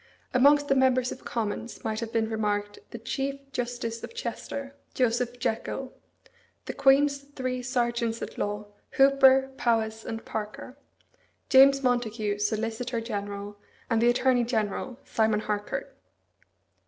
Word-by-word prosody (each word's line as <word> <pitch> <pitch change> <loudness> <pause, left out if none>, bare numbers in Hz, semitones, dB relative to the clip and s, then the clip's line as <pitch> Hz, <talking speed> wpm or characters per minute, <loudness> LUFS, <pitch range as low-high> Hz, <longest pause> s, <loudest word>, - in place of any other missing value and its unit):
Amongst 285 +3 +5
the 275 - +4
members 255 -1 +3
of - - -8
Commons 230 +1 -4
might 220 -2 -2
have 230 -1 -4
been 225 -1 +1
remarked 205 -2 -2
the - - -7
Chief 270 +4 -3
Justice 240 -2 -3
of - - -8
Chester, 280 - -5 0.2
Joseph 245 0 +1
Jekyll; 245 +3 -3 0.7
the - - -4
Queen's 280 +1 +4
three 260 -3 -4
Serjeants 235 -2 -1
at - - -7
Law 205 0 -3 0.3
Hooper, 270 -1 +6
Powys, 225 -2 0
and 225 0 -6
Parker; 215 +4 -6 0.7
James 275 +1 +7
Montagu, 225 -4 0
Solicitor 225 +3 -1
General; 205 -2 -5 0.3
and 225 -1 +3
the 240 - +5
Attorney 245 0 +3
General, 230 +1 -2
Simon 220 -1 +1
Harcourt. 210 -1 -3
235 Hz, 130 wpm, -27 LUFS, 220-260 Hz, 0.7 s, James